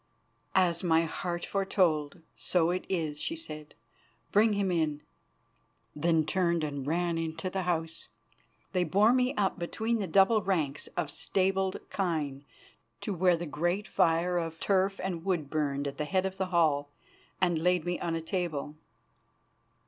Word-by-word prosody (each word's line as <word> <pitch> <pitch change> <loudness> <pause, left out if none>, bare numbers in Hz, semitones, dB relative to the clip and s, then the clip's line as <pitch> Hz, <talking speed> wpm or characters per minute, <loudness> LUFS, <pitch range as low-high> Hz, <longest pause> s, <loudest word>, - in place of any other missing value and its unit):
"As 175 -2 +3
my 165 -2 +4
heart 175 +1 -3
foretold, 175 -6 +1
so 175 -1 +1
it 185 - -2
is," 155 -5 -2
she 330 - -2
said. 155 - -9 0.6
"Bring 215 +1 +4
him 200 -2 0
in," 155 -4 0 0.9
then 160 0 +2
turned 170 -2 +1
and 140 -2 -3
ran 165 0 -1
to 185 +1 -4
the 190 - -1
house. 165 -2 -2 0.6
They 180 -2 +2
bore 200 +8 +4
me 255 +1 +2
up 195 -1 0
between 220 +7 -1
the 200 - -2
double 195 +5 +4
ranks 160 -7 -1
of 160 -4 -1
stabled 190 +3 0
kine 150 -7 -2 0.6
to 205 - -2
where 180 -1 +3
the 175 - -4
great 175 +7 -1
fire 170 +2 +2
of 165 -1 -5
turf 195 0 +1
and 175 -3 -3
wood 175 -7 -1
burned 145 -2 -1
at 140 - -6
the 150 - 0
head 185 +4 +1
of 190 0 -3
the 190 -1 -1
hall, 155 -5 +2 0.5
and 175 -3 +2
laid 180 -1 +2
me 175 0 -1
on 170 -1 -1
a 165 - -2
table. 160 -4 -3
175 Hz, 155 wpm, -30 LUFS, 160-190 Hz, 0.9 s, my